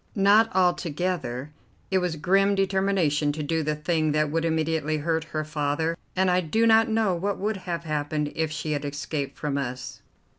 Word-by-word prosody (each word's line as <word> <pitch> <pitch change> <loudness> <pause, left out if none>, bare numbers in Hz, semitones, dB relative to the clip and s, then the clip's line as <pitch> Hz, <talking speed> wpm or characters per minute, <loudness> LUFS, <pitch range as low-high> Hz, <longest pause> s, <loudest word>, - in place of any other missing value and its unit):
"Not 210 +3 +5
altogether. 175 -6 0 0.4
It 190 - +3
was 180 -3 -1
grim 195 +6 +2
determination 190 -6 +1
to 155 0 -4
do 160 +2 0
the 150 0 -1
thing 155 0 0
that 150 -1 +1
would 165 +1 0
immediately 160 -1 0
hurt 160 +1 -1
her 155 -1 -3
father, 155 +2 -1 0.2
and 185 0 +3
I 180 0 +3
do 220 +8 +1
not 225 +1 +5
know 220 -3 +2
what 195 +3 -2
would 210 +1 -2
have 170 -1 -2
happened 150 -1 -2
if 160 -1 0
she 155 0 -4
had 145 -1 -1
escaped 140 0 -4
from 145 -2 -2
us. 125 -2 -5
160 Hz, 180 wpm, -25 LUFS, 150-185 Hz, 0.4 s, Not